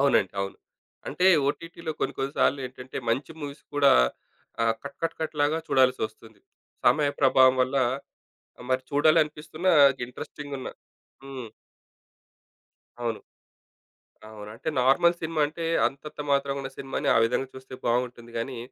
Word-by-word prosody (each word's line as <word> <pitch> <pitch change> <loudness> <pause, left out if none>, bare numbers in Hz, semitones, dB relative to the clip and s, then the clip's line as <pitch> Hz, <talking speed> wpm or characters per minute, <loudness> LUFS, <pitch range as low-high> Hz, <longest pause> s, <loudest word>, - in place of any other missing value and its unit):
అవునండి. 135 -9 +3
అవును. 100 0 -4 0.5
అంటే 180 - +1 0.2
ఓటీటీలో 165 +2 -4
కొన్ని - - -1
కొన్ని 135 +1 -2
సార్లేంటంటే 130 -1 -1
మంచి 135 +7 -1
మూవీస్ 145 -1 -7
కూడా 140 -1 +6 0.7
ఆహ్, 115 0 +2
కట్, 140 - -8
కట్, 165 0 -1
కట్‌లాగా 155 0 0
చూడాల్సొస్తుంది. 115 -4 0 0.5
సమయ 145 -1 +4
ప్రభావం 130 -1 +6
వల్ల 130 +2 -1 0.9
మరి 130 0 +1
చూడాలనిపిస్తున్నా 155 +3 +2 0.3
ఇంట్రెస్టింగున్న 140 +2 -7 0.6
హ్మ్. 130 -4 -7 1.5
అవును. 115 -2 -2 1.1
అవును. 105 -1 -10
అంటే 135 - -4
నార్మల్ 140 +7 +4
సినిమా 160 -1 -1
అంటే 165 +2 -7 0.2
అంతంత 150 +3 -10
మాత్రమున్న 140 -1 0
సినిమాని 135 0 -3
ఆ - - +6
విధంగా 125 +3 0
చూస్తే 130 0 -12
బావుంటుంది 120 0 -1
గానీ, 125 +2 -4
135 Hz, 115 wpm, -26 LUFS, 125-150 Hz, 1.5 s, కూడా